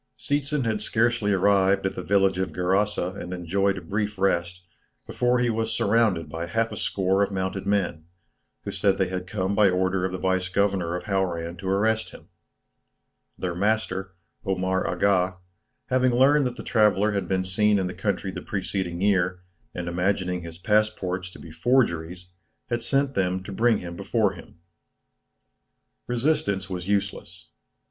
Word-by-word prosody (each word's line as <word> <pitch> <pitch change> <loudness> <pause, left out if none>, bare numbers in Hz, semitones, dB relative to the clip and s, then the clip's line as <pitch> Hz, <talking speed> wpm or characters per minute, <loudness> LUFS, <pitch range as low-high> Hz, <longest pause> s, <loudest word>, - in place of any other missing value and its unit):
Seetzen 145 -1 -1
had 110 -2 -1
scarcely 115 -1 +1
arrived 95 0 +3
at 95 - 0
the - - -5
village 95 -2 +2
of 95 -3 -1
Gerasa 95 +1 +1
and 90 - -7
enjoyed 95 +2 0
a - - -5
brief 105 +4 -3
rest, 90 -2 0 0.4
before 125 0 +1
he 120 -1 +2
was 115 0 -1
surrounded 105 -7 +2
by 80 +3 -5
half 115 +6 0
a - - -5
score 95 0 0
of 100 - +2
mounted 95 0 -3
men, 95 -6 0 0.6
who - - -4
said 95 -1 +1
they 95 -2 +1
had 90 0 -4
come 95 -1 -1
by 100 -1 +5
order 95 0 0
of 95 - -1
the 95 - -3
vice 95 -1 0
governor 95 -3 0
of 90 - -4
Hauran 90 -4 -1
to 95 +1 -4
arrest 110 +3 +1
him. - - -15 1.1
Their 90 -2 -3
master, 95 -1 -1 0.3
Omar 95 0 0
Aga, 95 -2 +1 0.5
having 130 -1 +2
learned 140 +2 +5
that 125 - -5
the - - -8
traveller 105 -2 +3
had 100 -1 -2
been 95 -1 0
seen 105 +3 +3
in 95 - 0
the 90 - -4
country 95 +1 -2
the - - -6
preceding 95 -3 -3
year, 95 -2 +1 0.3
and 90 -1 -4
imagining 90 0 0
his 85 -1 -9
passports 100 -3 0
to - - -13
be 80 - -11
forgeries, 90 -4 0 0.4
had 120 0 0
sent 135 +3 +1
them 95 -2 0
to 100 - -8
bring 115 +3 +3
him 85 -1 -7
before 100 +1 0
him. 90 - -13 1.5
Resistance 115 -7 0
was 90 0 -4
useless. 100 -1 -3
95 Hz, 165 wpm, -25 LUFS, 90-105 Hz, 1.5 s, by